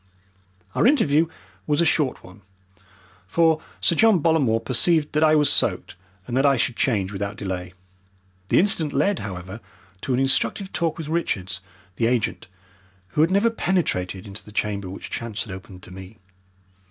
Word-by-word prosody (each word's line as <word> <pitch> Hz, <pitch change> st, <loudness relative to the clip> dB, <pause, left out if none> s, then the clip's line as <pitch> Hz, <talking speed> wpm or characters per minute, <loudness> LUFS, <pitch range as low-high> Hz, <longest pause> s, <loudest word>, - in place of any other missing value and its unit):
Our -, -, +3 dB
interview 165 Hz, -, +3 dB, 0.4 s
was 150 Hz, 0 st, +1 dB
a 170 Hz, -, +4 dB
short 150 Hz, -5 st, +1 dB
one, 90 Hz, +3 st, -15 dB, 0.9 s
for 160 Hz, +5 st, +2 dB, 0.2 s
Sir -, -, +3 dB
John 220 Hz, +3 st, +5 dB
Bollamore 145 Hz, -8 st, +2 dB
perceived 150 Hz, +5 st, +2 dB
that 150 Hz, -, +1 dB
I 155 Hz, 0 st, +5 dB
was 150 Hz, -1 st, +4 dB
soaked, -, -, +1 dB, 0.3 s
and 120 Hz, -, -4 dB
that 135 Hz, -, +3 dB
I 140 Hz, -1 st, +4 dB
should 125 Hz, 0 st, 0 dB
change 105 Hz, -8 st, 0 dB
without 100 Hz, +1 st, -4 dB
delay. 90 Hz, -2 st, -5 dB, 0.8 s
The -, -, +3 dB
incident 165 Hz, -5 st, +2 dB
led, 185 Hz, +8 st, +1 dB
however, 95 Hz, +1 st, -7 dB, 0.4 s
to 130 Hz, -, -2 dB
an -, -, 0 dB
instructive 135 Hz, +8 st, +1 dB
talk 165 Hz, -2 st, -1 dB
with 160 Hz, -3 st, -6 dB
Richards, 130 Hz, -, -2 dB, 0.4 s
the 115 Hz, -, +2 dB
agent, 120 Hz, -6 st, -1 dB, 0.6 s
who 150 Hz, -, 0 dB
had 160 Hz, -, +4 dB
never 200 Hz, +5 st, +3 dB
penetrated 100 Hz, -, -1 dB
into 100 Hz, +1 st, -8 dB
the 105 Hz, -, -13 dB
chamber 100 Hz, -3 st, -2 dB
which 95 Hz, -, -9 dB
chance 115 Hz, -1 st, -4 dB
had 110 Hz, -, -10 dB
opened 95 Hz, -1 st, -11 dB
to -, -, -12 dB
me. 95 Hz, +3 st, -11 dB
130 Hz, 165 wpm, -23 LUFS, 100-160 Hz, 0.9 s, John